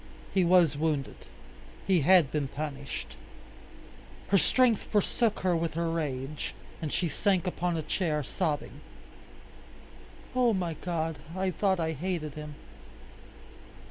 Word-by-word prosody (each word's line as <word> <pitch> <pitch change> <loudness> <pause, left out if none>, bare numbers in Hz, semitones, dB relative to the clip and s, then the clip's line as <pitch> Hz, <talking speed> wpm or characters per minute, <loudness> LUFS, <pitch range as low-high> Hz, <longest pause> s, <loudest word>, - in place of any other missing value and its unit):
He 190 - +4
was 170 -4 +5
wounded. 150 -2 -2 0.6
He 185 -4 +3
had 170 -2 +5
been 150 -3 0
punished. 140 -1 -6 1.1
Her 200 - +5
strength 250 0 +3
forsook 215 +1 0
her 180 -2 +2
with 165 -1 -1
her 165 0 0
rage, 145 -3 -3 0.3
and 155 -3 -3
she 175 - 0
sank 185 +4 +1
upon 175 -1 -1
a 160 - -2
chair, 155 -2 -1
sobbing, 150 -2 -3 1.5
"Oh! 245 -2 +4
my 175 -3 -1
God, 160 -2 -3 0.2
I 190 0 +1
thought 190 0 +1
I 160 -1 0
hated 160 -1 -3
him!" 150 -1 -8
165 Hz, 125 wpm, -29 LUFS, 150-185 Hz, 1.5 s, was